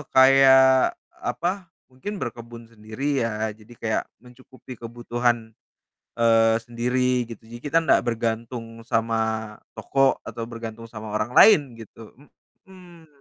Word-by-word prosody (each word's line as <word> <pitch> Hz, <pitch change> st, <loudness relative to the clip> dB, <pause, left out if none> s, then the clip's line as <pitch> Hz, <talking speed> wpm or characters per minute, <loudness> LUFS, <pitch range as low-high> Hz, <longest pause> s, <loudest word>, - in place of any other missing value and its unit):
kayak, 130 Hz, 0 st, +6 dB, 0.3 s
apa, 180 Hz, +1 st, -2 dB, 0.2 s
mungkin 165 Hz, +12 st, -7 dB
berkebun 115 Hz, -1 st, -7 dB
sendiri 115 Hz, +5 st, -3 dB
ya, 110 Hz, -1 st, -2 dB
jadi 110 Hz, +2 st, -17 dB
kayak 110 Hz, -1 st, -1 dB, 0.2 s
mencukupi 130 Hz, +1 st, -14 dB
kebutuhan, 120 Hz, -1 st, -2 dB, 0.7 s
eee, 115 Hz, -1 st, +4 dB
sendiri 125 Hz, +1 st, 0 dB
gitu. 115 Hz, -1 st, -10 dB
Jadi 120 Hz, +1 st, -10 dB
kita 150 Hz, +3 st, +1 dB
ndak 155 Hz, -, +3 dB
bergantung 115 Hz, 0 st, -4 dB
sama 115 Hz, -1 st, 0 dB, 0.6 s
toko, 135 Hz, -1 st, +1 dB
atau 115 Hz, 0 st, -6 dB
bergantung 115 Hz, 0 st, -8 dB
sama 110 Hz, -1 st, -8 dB
orang 110 Hz, +3 st, -2 dB
lain 210 Hz, -7 st, +9 dB, 0.2 s
gitu, 115 Hz, 0 st, -13 dB, 0.7 s
mhm. 175 Hz, -4 st, -16 dB
120 Hz, 120 wpm, -23 LUFS, 115-130 Hz, 0.7 s, lain